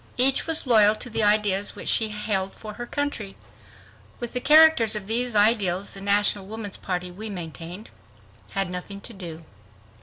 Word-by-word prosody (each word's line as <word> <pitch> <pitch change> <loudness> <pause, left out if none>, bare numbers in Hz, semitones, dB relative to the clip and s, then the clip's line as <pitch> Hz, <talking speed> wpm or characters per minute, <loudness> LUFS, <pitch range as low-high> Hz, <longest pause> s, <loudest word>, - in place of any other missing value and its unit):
Each 265 +4 +4
was 325 -2 0
loyal 215 -4 +5
to 245 +2 -3
the 225 - -1
ideas 205 -1 +1
which - - -8
she 220 -1 +4
held 205 -2 -3
for 215 -1 -10
her 240 +2 -8
country. 285 -10 -4 0.8
With 240 -1 -6
the 250 - -1
character 310 -2 +5
of 210 -2 +1
these 240 +3 0
various - - -4
ideals, 205 -3 +1
the 195 - -7
National 200 -1 +1
Woman's 210 -1 -6
Party, 180 -1 -5
we 215 +5 -8
maintained, 175 +2 -9 0.6
had 195 -2 -1
nothing 180 +2 -6
to 235 - -10
do. 170 -5 -10
210 Hz, 175 wpm, -23 LUFS, 195-230 Hz, 0.8 s, loyal